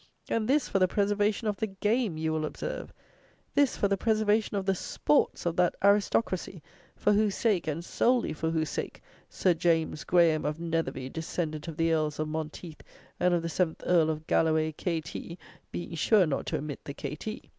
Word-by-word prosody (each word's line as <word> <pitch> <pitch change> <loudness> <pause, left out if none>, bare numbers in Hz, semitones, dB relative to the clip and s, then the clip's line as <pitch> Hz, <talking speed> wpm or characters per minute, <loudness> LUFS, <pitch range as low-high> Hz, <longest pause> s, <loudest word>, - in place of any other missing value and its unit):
And 220 -1 0
this 280 +2 +2
for 195 - 0
the 185 - +4
preservation 205 +2 +1
of 205 -1 -1
the 220 - -1
game, 210 -1 0
you 160 0 -1
will 155 0 -1
observe! 155 - -5 0.6
This 285 -3 +3
for 200 - +2
the 200 0 +1
preservation 215 0 +1
of 195 - -2
the 195 - +3
sports 150 -4 0
of 170 -1 0
that 180 -1 +3
aristocracy 200 -4 +1 0.3
for 210 - +2
whose 210 -1 +2
sake, 205 -8 +1
and 160 +3 -3
solely 245 +4 +1
for 160 +1 -2
whose 160 -2 -1
sake, - - -5 0.3
"Sir 180 - +2
James 165 -2 +1
Graham, 170 -3 +3
of 150 +2 -2
Netherby, 165 -6 -2
descendant 160 0 -4
of 160 -2 -6
the 165 0 +2
Earls 155 -2 0
of 155 0 -2
Monteith 155 +1 -6 0.4
and 180 0 +3
of 170 - -1
the - - -2
seventh 165 -1 -1
Earl 165 -3 +4
of 155 0 -3
Galloway, 155 -1 +2
K.T." 165 +1 -4 0.3
(being 175 - -5
sure 185 +5 +4
not 145 -4 -2
to - - -1
omit 145 -1 -6
the 140 - -7
K.T.) 215 +9 -6
170 Hz, 190 wpm, -29 LUFS, 155-205 Hz, 0.6 s, the